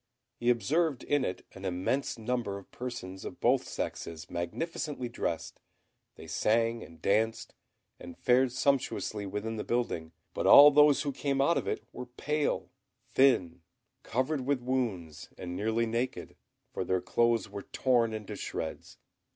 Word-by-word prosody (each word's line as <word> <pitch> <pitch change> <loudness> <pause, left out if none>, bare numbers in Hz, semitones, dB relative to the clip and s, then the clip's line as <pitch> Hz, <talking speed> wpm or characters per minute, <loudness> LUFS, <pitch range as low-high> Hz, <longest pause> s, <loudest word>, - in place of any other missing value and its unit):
He 120 - +1
observed 135 - +1
in 145 -2 +1
it 90 -6 -4
an 95 - -11
immense 95 +11 -1
number 115 -3 -2
of 100 - -13
persons 110 -7 -6
of - - -8
both - - +2
sexes 80 -1 -5
magnificently 125 - -3
dressed: 85 -8 -3 0.6
they - - -11
sang 115 +1 +1
and 85 0 -12
danced, 110 +3 0 0.5
and 85 -1 -10
fared 125 +1 +3
sumptuously 125 -6 0
within 105 +3 -4
the 105 - -3
building; 100 -10 -2 0.2
but - - -1
all 145 +1 +10
those 145 -1 +5
who 145 - -1
came 140 0 -1
out 165 +5 +4
of - - -7
it - - -2
were 125 0 -7
pale, 150 +4 -2 0.4
thin, 90 -11 +3 0.4
covered 130 +4 -1
with 135 +1 0
wounds, 110 - -2
and 90 -1 -6
nearly 110 +4 0
naked, 115 +3 -3 0.4
for - - -2
their 95 0 +1
clothes 115 0 +2
were 100 0 -7
torn 120 +1 +1
into 110 -2 -6
shreds. 80 - -6
115 Hz, 150 wpm, -30 LUFS, 95-130 Hz, 0.6 s, all